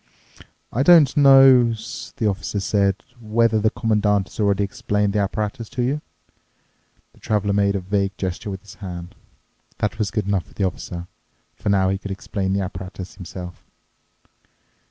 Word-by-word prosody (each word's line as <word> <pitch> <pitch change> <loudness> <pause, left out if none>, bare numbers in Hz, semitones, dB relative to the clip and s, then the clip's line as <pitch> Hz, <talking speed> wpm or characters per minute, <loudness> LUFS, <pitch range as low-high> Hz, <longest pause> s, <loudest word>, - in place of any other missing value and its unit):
"I 120 - +1
don't 150 -2 +6
know," 135 -4 +7 0.4
the 110 - -2
officer 100 0 -2
said, 100 0 +1 0.2
"whether 115 0 +2
the 110 +1 +3
Commandant 105 -3 +1
has - - -14
already 100 -1 +2
explained 105 0 -1
the 105 - +1
apparatus 105 +2 -2
to 125 -1 -2
you." 140 +5 -1 1.1
The - - -22
Traveler 105 -2 0
made 100 0 +2
an 100 - -1
vague 100 +1 -1
gesture 95 +2 -4
with 95 -1 -6
his 100 - -12
hand. 90 -2 -7 0.6
That 110 +2 -2
was 105 -2 0
good 105 - -2
enough 100 -5 0
for 70 - -20
the 100 - -1
Officer, 90 -1 -5 0.5
for - - -4
now 95 -2 +3
he 95 0 -1
could 100 - -7
explain 95 0 -3
the 100 - 0
apparatus 95 0 -7
himself. 90 -1 -9
100 Hz, 160 wpm, -22 LUFS, 95-110 Hz, 1.1 s, know